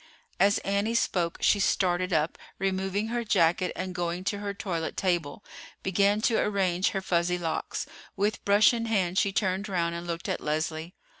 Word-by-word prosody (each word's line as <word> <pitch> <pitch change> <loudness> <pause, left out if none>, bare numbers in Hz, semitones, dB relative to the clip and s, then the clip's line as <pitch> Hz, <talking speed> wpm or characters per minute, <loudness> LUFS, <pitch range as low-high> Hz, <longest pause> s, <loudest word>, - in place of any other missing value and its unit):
As 200 +1 +4
Annie 200 +3 0
spoke 175 -7 0
she 205 - +4
started 185 -1 +1
up, 155 0 0 0.2
removing 195 +2 -1
her 240 0 -1
jacket, 180 -3 +2
and, 185 0 -4
going 175 0 -2
to 205 +1 -2
her 205 -1 -3
toilet 175 -5 -4
table, 175 -2 -1 0.4
began 200 +2 +2
to 225 0 +2
arrange 190 -3 +1
her 195 - -2
fuzzy 180 -1 +1
locks. 165 -2 -3 0.3
With 205 +2 -1
brush 205 +3 +5
in 230 -1 -2
hand 190 -5 +1
she 200 - +1
turned 195 +1 -1
round 170 -3 0
and 170 +1 -6
looked 170 -1 -4
at - - -2
Leslie. 155 +3 -2
185 Hz, 170 wpm, -28 LUFS, 175-200 Hz, 0.4 s, brush